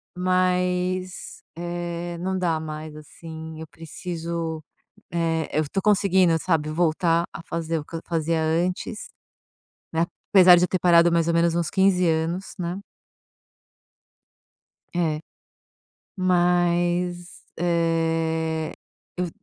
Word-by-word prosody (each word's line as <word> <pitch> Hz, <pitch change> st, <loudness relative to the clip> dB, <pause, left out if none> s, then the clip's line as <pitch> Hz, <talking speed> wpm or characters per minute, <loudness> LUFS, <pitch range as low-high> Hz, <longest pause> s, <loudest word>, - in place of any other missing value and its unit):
Mas, 180 Hz, 0 st, 0 dB
eh, 175 Hz, 0 st, -4 dB
não 190 Hz, +2 st, -2 dB
dá 170 Hz, -3 st, 0 dB
mais, 155 Hz, 0 st, -7 dB
assim, 160 Hz, +1 st, -9 dB
eu 160 Hz, -, -6 dB
preciso 165 Hz, 0 st, -5 dB, 0.5 s
eh, 165 Hz, -2 st, 0 dB
eu -, -, +2 dB
tô 195 Hz, -, 0 dB
conseguindo, 190 Hz, -4 st, +3 dB
sabe, 160 Hz, -3 st, 0 dB
voltar 165 Hz, +1 st, +1 dB
a -, -, -7 dB
fazer 165 Hz, -1 st, -2 dB
o 150 Hz, -, -8 dB
que -, -, -9 dB
eu 165 Hz, -, -4 dB
fazia 165 Hz, -1 st, 0 dB
antes, 175 Hz, -, -1 dB, 0.9 s
né, 165 Hz, +1 st, +2 dB, 0.3 s
apesar 185 Hz, -2 st, +9 dB
de 175 Hz, -, +3 dB
eu -, -, +3 dB
ter 185 Hz, -, -1 dB
parado 170 Hz, -1 st, +5 dB
mais 170 Hz, -1 st, +2 dB
ou 170 Hz, -, +2 dB
menos 170 Hz, 0 st, +2 dB
uns 170 Hz, -2 st, 0 dB
15 190 Hz, -2 st, +3 dB
anos, 165 Hz, +3 st, -1 dB
né. 175 Hz, +2 st, -3 dB, 2.2 s
É. 160 Hz, -3 st, 0 dB, 1.0 s
Mas, 175 Hz, -1 st, +1 dB, 0.2 s
eh, 165 Hz, -2 st, 0 dB, 0.4 s
eu 180 Hz, 0 st, -1 dB
170 Hz, 115 wpm, -24 LUFS, 160-180 Hz, 2.2 s, apesar